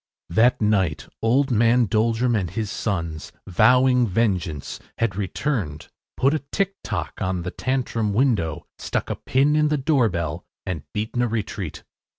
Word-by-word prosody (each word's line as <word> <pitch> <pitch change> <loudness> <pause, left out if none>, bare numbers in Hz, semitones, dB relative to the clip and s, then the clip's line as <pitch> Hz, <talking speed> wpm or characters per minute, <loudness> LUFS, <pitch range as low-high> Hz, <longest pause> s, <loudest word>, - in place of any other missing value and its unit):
That 115 +8 +4
night 95 -8 +1
old 130 +5 +2
man 120 +2 +4
Doldrum 115 +3 +1
and 95 -5 0
his 110 0 -3
sons, 85 -9 -3
vowing 125 +5 +4
vengeance, 90 -8 -1 0.2
had 115 -5 0
returned, 100 - -2 0.3
put 135 +3 +3
a 155 - +1
ticktock 115 - -3
on 90 -2 -1
the 90 - -4
Tantrum 120 -5 -1
window, 100 - +1
stuck - - -2
a - - -1
pin 140 +4 +2
in 150 0 +3
the 150 0 +1
doorbell, 105 - 0 0.2
and 90 -6 -3
beaten 110 +3 -2
a 120 - +2
retreat. 105 -6 -4
110 Hz, 145 wpm, -23 LUFS, 90-125 Hz, 0.3 s, That